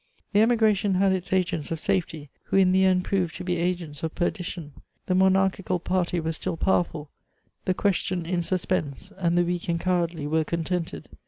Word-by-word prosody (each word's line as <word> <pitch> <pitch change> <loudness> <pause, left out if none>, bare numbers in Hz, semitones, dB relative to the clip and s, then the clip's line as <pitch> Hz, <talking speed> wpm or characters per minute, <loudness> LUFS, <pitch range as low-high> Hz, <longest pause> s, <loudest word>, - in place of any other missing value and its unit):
The 205 - +5
emigration 220 -4 +3
had 195 +1 +3
its 185 0 -3
agents 180 -5 0
of 165 - -3
safety, 165 -6 -1
who - - 0
in 185 -1 +5
the 190 +1 +4
end 185 -1 +3
proved 180 -4 0
to 180 - -6
be 180 -1 -1
agents 170 -4 -2
of 160 -1 -4
perdition. 175 -3 -3 0.3
The 185 - 0
monarchical 190 0 +2
party 180 0 0
was 160 0 -2
still - - -3
powerful, 160 -5 0 0.5
the 185 - +1
question 185 -3 0
in 175 +1 0
suspense, 180 -2 -2
and 175 -1 +1
the 175 - +4
weak 175 0 -3
and 170 0 +1
cowardly 170 -4 0
were 160 +2 +1
contented. 165 - -3
180 Hz, 180 wpm, -26 LUFS, 165-190 Hz, 0.5 s, The